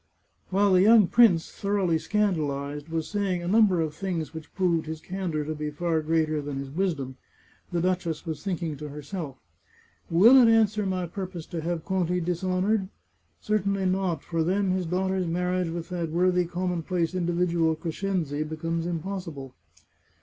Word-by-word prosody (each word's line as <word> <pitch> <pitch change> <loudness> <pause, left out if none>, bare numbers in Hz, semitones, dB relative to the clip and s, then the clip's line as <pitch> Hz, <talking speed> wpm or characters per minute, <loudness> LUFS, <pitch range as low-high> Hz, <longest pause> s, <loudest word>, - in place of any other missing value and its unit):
While 195 +1 +3
the 185 - +6
young 215 +1 +7
prince, 185 -5 +4
thoroughly 195 -5 0
scandalized, 150 -8 -1
was 160 -1 -2
saying 195 -4 -1
a - - -4
number 200 -3 +4
of 155 -2 -2
things 165 -3 -3
which 160 -1 -9
proved 170 -4 +1
his 160 0 -5
candour 175 -3 -3
to 155 - -3
be 150 0 -4
far 160 +1 -1
greater 155 -1 +1
than 145 -1 -5
his 135 0 -5
wisdom, 145 -7 -2 0.5
the 175 -1 0
duchess 175 -3 -1
was 160 -3 -5
thinking 170 -5 -2
to 150 +1 -7
herself. 150 0 -6 0.4
" - - -33
Will 210 +11 +7
it 250 -3 +7
answer 215 -2 +3
my 185 -1 -1
purpose 180 -1 -6
to 170 - -5
have 165 0 -3
Conti 180 -2 0
dishonoured? 185 +3 0 0.5
Certainly 200 -2 0
not, 185 -4 0
for 165 -2 -1
then 190 +3 +1
his 185 -2 -1
daughter's 185 +1 0
marriage 180 +1 0
with 165 0 -5
that 175 -3 -3
worthy 180 +2 +2
commonplace 175 -1 -2
individual 170 -2 +1
Crescenzi 165 -2 -2
becomes 165 +2 -3
impos 180 +2 -4
sible." 135 -4 -9
175 Hz, 165 wpm, -26 LUFS, 160-190 Hz, 0.5 s, young